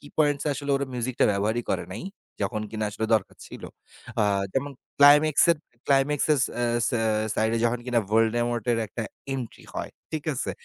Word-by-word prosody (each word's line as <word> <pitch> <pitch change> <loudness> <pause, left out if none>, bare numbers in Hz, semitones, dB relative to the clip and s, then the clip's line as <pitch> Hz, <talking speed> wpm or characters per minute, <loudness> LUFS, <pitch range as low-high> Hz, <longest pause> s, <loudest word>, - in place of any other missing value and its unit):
কি 145 - -13
পয়েন্টস 145 -2 +2
আসলে 140 0 -4
ওরা 140 0 0
মিউজিকটা 125 +1 0
ব্যবহারই 110 +4 0
করে - - -1
নাই, - - -6 0.4
যখন 110 -3 -1
কিনা 110 -1 -3
আসলে 110 +2 -3
দরকার 110 - -1
ছিল। - - -11 0.6
আ - - +3 0.3
যেমন 140 +2 -1 0.3
ক্লাইমেক্সের, 150 +3 +6 0.3
ক্লাইমেক্সসেস, 145 +1 +2 0.2
এ্যা 120 - +1 0.2
স্যা 120 - 0 0.3
সাইড 110 0 +1
এ - - 0
যখন 120 +1 +1
কিনা 120 -2 +2
'ভলডেমর্ট' 120 +2 +1
এর 115 - +1
একটা 115 +3 -5 0.3
এন্ট্রি 125 -4 -6
হয়, - - -4 0.2
ঠিক 155 -2 -4
আছে। 130 - -2
125 Hz, 170 wpm, -26 LUFS, 115-145 Hz, 0.6 s, ক্লাইমেক্সের